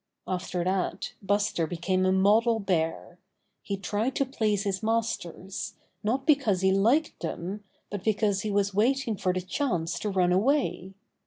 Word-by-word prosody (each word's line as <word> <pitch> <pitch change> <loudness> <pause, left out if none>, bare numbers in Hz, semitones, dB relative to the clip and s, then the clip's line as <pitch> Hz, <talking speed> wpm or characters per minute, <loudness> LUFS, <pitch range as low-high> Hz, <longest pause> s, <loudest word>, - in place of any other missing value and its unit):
After 180 -1 -2
that 185 +1 -1
Buster 200 -4 +1
became 185 +3 0
a - - +3
model 215 +4 +4
bear. 175 -2 -1 0.4
He 200 - -3
tried 205 +7 -1
to 275 - +2
please 215 -6 0
his 195 -1 -2
masters, 215 -5 -2 0.3
not 250 +6 -1
because 275 - +3
he 190 0 +4
liked 230 +11 +2
them, 185 +5 -4 0.3
but 205 -2 -4
because 210 -2 +1
he 215 - -3
was 200 -1 +1
waiting 235 +3 +2
for 185 -1 0
the 185 0 -2
chance 180 - -1
to 210 - -2
run 180 -2 +2
away. 190 - +1
200 Hz, 155 wpm, -28 LUFS, 185-225 Hz, 0.4 s, model